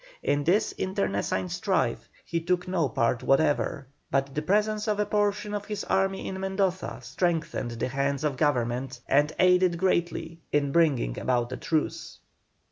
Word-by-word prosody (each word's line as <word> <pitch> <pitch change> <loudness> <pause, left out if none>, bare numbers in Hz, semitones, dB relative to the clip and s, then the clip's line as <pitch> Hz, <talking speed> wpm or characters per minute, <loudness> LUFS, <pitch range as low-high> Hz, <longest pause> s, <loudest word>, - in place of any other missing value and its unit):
In 145 0 +1
this 190 +7 +3
internecine 100 - -1
strife - - -1 0.2
he 170 - -2
took 180 +2 0
no 170 -6 +1
part 115 +1 +1
whatever, 145 0 +1 0.2
but 135 0 0
the 150 - -1
presence 210 +5 +1
of 210 -1 0
a 210 - +2
portion 205 0 0
of 205 -1 -3
his 210 -1 -4
army 195 0 0
in 190 - -4
Mendoza 190 -6 -1
strengthened 165 +1 -1
the 115 - -2
hands 140 +2 -1
of 150 -3 0
Government 130 -2 0
and 145 +2 +3
aided 180 -1 +4
greatly 170 -2 -1
in 145 -1 +1
bringing 140 - +2
about 120 -1 0
a 130 - -4
truce. 155 -2 -2
165 Hz, 155 wpm, -27 LUFS, 135-190 Hz, 0.2 s, aided